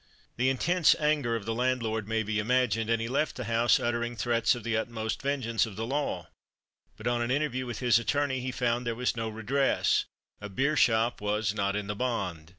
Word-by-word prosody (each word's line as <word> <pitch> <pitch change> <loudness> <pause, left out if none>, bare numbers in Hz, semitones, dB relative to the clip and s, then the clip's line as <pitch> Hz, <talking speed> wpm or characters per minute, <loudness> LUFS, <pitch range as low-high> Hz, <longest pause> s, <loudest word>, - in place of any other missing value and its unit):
The 130 +2 +2
intense 170 +6 +3
anger 150 -6 +1
of 110 -3 -4
the 115 - -1
landlord 115 -3 -1
may 110 0 0
be 105 0 -1
imagined; 115 -1 +1
and 115 -1 +2
he 115 - -2
left 140 +5 0
the 125 - -4
house 115 +1 +3
uttering 120 0 -1
threats 115 +1 +2
of 120 - -8
the 115 0 -1
utmost 110 0 -3
vengeance 130 -5 0
of 105 - -9
the 110 +2 -3
law; 140 +4 -2 0.7
but - - -11
on 120 0 +1
an 120 - -1
interview 130 -2 -1
with 120 - -5
his 120 -2 +4
attorney 140 +2 0
he 130 +1 -3
found 120 -1 -1
there 115 - -1
was 125 +1 -1
no 115 -1 -2
redress 120 +6 +1 0.4
a 105 - -6
beer 140 +10 0
shop 115 -3 +2
was 105 0 0
"not 100 -1 -1
in 105 -1 -2
the 105 - -3
bond." 100 -9 -3
120 Hz, 210 wpm, -29 LUFS, 110-130 Hz, 0.7 s, his